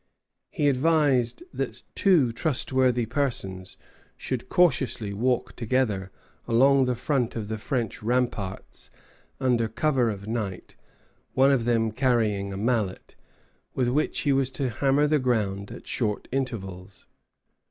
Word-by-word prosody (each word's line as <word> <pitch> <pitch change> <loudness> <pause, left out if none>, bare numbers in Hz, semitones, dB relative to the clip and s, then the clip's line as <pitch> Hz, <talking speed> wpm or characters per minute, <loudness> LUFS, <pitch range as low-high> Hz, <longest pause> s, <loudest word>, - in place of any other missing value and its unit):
He 150 -6 0
advised 140 - +2
that - - -4
two 165 - +3
trustworthy 130 -3 +1
persons 105 -8 -2 0.4
should 130 -1 -4
cautiously 135 - +2
walk 125 +4 0
together 110 -5 0 0.4
along 135 +3 +4
the 125 -1 0
front 125 -1 -1
of 110 -2 -4
the 110 0 -3
French 120 -1 -3
ramparts 115 -5 -2 0.5
under 125 -4 +2
cover 125 +1 +1
of 100 -1 -6
night, 105 -5 -4 0.6
one 135 +1 +5
of 125 -4 +1
them 115 -2 +1
carrying 110 -5 +1
a 95 - -5
mallet, 110 -3 -1 0.6
with 125 -2 +1
which 145 +5 0
he 145 - +2
was 135 -1 +1
to 135 -3 -2
hammer 140 +6 +2
the 150 0 +2
ground 105 -6 -1
at - - -10
short 105 -4 -2
intervals. 100 -8 -5
120 Hz, 130 wpm, -26 LUFS, 110-135 Hz, 0.6 s, one